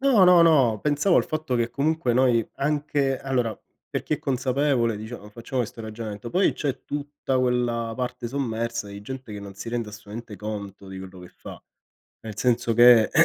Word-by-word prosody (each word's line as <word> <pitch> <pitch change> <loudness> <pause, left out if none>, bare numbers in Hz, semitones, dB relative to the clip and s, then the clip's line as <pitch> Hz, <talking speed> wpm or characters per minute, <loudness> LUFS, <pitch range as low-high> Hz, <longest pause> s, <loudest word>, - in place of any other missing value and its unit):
No, 260 -9 +5
no, 180 -1 +7
no, 135 -10 +4
pensavo 150 - +2
al - - +4
fatto 155 -4 -2
che 120 0 0
comunque 145 0 0
noi 120 -2 +3
anche 145 -2 0
allora 125 -5 -1 0.3
per - - -3
chi 155 - 0
è - - -7
consapevole, 130 -3 +1
diciamo, 110 0 -8
facciamo 120 +4 -4
questo 115 0 -7
ragionamento, 110 0 -6
poi 185 +7 +3
c'è 135 -3 -3
tutta 145 -2 -2
quella 120 -2 0
parte 125 -1 -3
sommersa 115 -4 -2
di 100 0 -8
gente 130 +1 -8
che 105 - -6
non 100 -1 -9
si 100 +4 -7
rende 115 -2 -2
assolutamente 110 +1 -9
conto 100 -1 -6
di 95 - -7
quello 95 -1 -10
che 90 - -11
fa, - - -12 0.6
nel 110 -2 -8
senso 120 -1 +1
che 120 -1 +7
120 Hz, 180 wpm, -25 LUFS, 110-135 Hz, 0.6 s, no